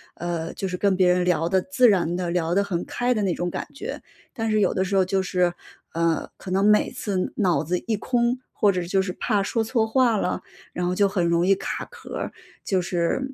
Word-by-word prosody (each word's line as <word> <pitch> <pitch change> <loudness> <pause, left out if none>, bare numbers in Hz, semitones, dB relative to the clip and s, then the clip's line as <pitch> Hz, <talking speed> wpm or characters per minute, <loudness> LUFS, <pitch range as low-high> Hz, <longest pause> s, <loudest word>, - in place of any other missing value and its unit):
呃， 170 -1 -4
就 195 - -3
是 180 - -3
跟 200 0 +2
别 185 -1 +3
人 180 0 +2
聊 170 -2 +1
得 190 - +3
自 260 -4 +4
然 175 -4 +2
地 180 -1 -2
聊 170 -1 0
得 200 - +3
很 180 -4 -3
开 245 +1 -1
的 215 - 0
那 185 -3 +1
种 175 +1 -2
感 - - -5
觉， 430 - -6 0.3
但 225 -3 -2
是 215 - +3
有 205 - +3
的 190 - +1
时 195 - -2
候 190 - +5
就 190 +1 +1
是， 180 -1 +1 0.4
呃， 165 -1 0
可 185 - -8
能 195 +2 +2
每 210 0 +4
次 190 -3 -2
脑 180 -6 +2
子 180 +3 -1
一 225 - +1
空， 240 +2 0
或 205 - +3
者 180 -2 -2
就 190 +2 +1
是 190 -1 -3
怕 205 -4 0
说 225 +3 0
错 225 0 +1
话 240 0 +3
了？ 180 - -1 0.3
然 180 - -2
后 180 - 0
就 200 +1 +4
很 190 -3 0
容 170 +1 +2
易 195 +1 +5
卡 - - -4
壳 - - -10
儿。 - - -4 0.3
就 190 - +1
是 180 +10 -1
190 Hz, 255 characters per minute, -24 LUFS, 180-215 Hz, 0.4 s, 候